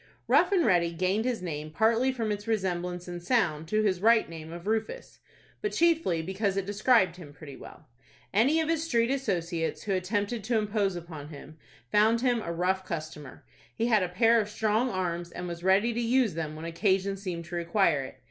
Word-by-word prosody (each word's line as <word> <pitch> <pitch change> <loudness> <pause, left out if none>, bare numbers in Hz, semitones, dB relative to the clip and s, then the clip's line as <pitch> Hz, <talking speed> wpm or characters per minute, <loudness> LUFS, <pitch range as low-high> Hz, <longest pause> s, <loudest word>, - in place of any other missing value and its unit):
Rough 360 - +4
and 360 -6 +3
Ready 170 -4 +2
gained 185 +6 0
his 240 -7 -2
name 155 -3 -5
partly 225 +10 +2
from 230 -4 -2
its 205 +1 -4
resemblance 180 -4 -2
in 175 0 -5
sound 175 -6 0
to 215 +5 +1
his 185 -4 0
right 225 +1 +4
name 160 -1 -9
of 170 +1 -9
Rufus, 225 - -3 0.4
but 420 - -2
chiefly 325 - +2
because 195 +2 -2
it 195 - -1
described 205 -3 +2
him 160 -5 -11
pretty 145 -1 -11
well. - - -13 0.5
Any 265 +10 +3
of 320 - 0
his 325 -1 0
street 235 -6 +1
associates, 175 -11 -2
who 205 - -1
attempted 205 +4 -2
to 235 0 +1
impose 205 -3 0
upon 165 -4 -8
him, 155 +1 -12 0.3
found 220 +2 +4
him 245 -3 +1
a 170 - -4
rough 185 +3 0
customer. 155 -5 -7 0.3
He 230 - 0
had 220 -4 +3
a 180 - -1
pair 225 +5 +4
of 210 - -5
strong 220 +3 0
arms, 175 -4 -3
and 180 0 -6
was 170 0 -7
ready 195 +5 +3
to 235 - -2
use 235 -3 +2
them 155 -1 -4
when 155 +1 -8
occasion 190 +3 0
seemed 180 -4 -5
to 170 +1 -7
require 170 -3 +2
it. 130 0 -9
195 Hz, 200 wpm, -28 LUFS, 170-225 Hz, 0.5 s, Rough